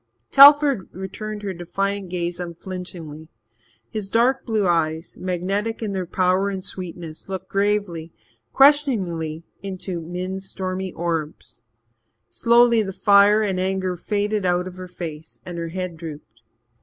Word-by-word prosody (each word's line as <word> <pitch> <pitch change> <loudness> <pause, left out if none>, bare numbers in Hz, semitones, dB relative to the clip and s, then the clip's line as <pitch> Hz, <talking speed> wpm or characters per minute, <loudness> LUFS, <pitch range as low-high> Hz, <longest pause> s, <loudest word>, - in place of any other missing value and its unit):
Telford 280 - +7
returned 210 +3 -6
her 195 -2 -3
defiant 195 +2 -3
gaze 175 -1 -3
unflinchingly. 170 -3 -7 0.6
His 210 -3 -4
dark 250 +5 +2
blue 215 -3 +1
eyes, 165 -1 0
magnetic 195 +5 -2
in 210 - -2
their 185 -2 -3
power 185 +2 +2
and 190 -1 -5
sweetness, 170 -3 -7
looked 190 -1 -5
gravely, 195 -5 -1 0.4
questioningly, 190 - +3 0.2
into 185 -2 -4
Min's 185 +3 -5
stormy 185 0 -4
orbs. 165 -6 -4 0.7
Slowly 235 -1 +4
the 195 -2 -4
fire 205 +1 +5
and 190 -3 -1
anger 185 -1 -1
faded 205 +3 -1
out 180 0 +1
of 185 0 -9
her 185 0 -7
face 165 -3 -8
and 175 -2 -6
her 165 - -3
head 180 -1 -5
drooped. 150 -8 -10
185 Hz, 130 wpm, -22 LUFS, 170-205 Hz, 0.7 s, Telford